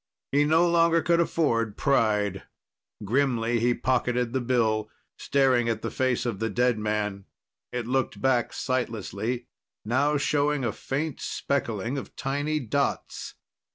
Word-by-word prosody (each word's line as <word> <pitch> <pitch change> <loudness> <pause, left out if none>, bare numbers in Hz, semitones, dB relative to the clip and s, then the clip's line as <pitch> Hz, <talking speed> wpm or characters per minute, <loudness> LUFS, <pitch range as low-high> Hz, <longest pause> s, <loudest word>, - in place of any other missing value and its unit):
He 145 +1 +3
no 165 +3 +4
longer 165 -1 +3
could 170 -1 +3
afford 115 -11 +1
pride. 105 -8 +1 0.6
Grimly, 120 -1 +1
he 120 +1 +2
pocketed 125 -1 0
the 130 - 0
bill, 115 -3 +1 0.3
staring 130 -4 +2
at 110 -1 -2
the - - -2
face 130 -1 0
of 115 -5 -2
the 115 - -1
dead 120 +1 +1
man. 105 -2 -2 0.5
It 125 -2 -3
looked 130 -4 -1
back 125 +1 +2
sightlessly, 120 -1 -2 0.4
now 140 +6 +2
showing 145 -1 +1
a 115 - 0
faint 140 +7 -3
speckling 120 -1 -2
of - - -11
tiny 145 +3 -1
dots. 140 +2 -2
125 Hz, 135 wpm, -26 LUFS, 115-140 Hz, 0.6 s, no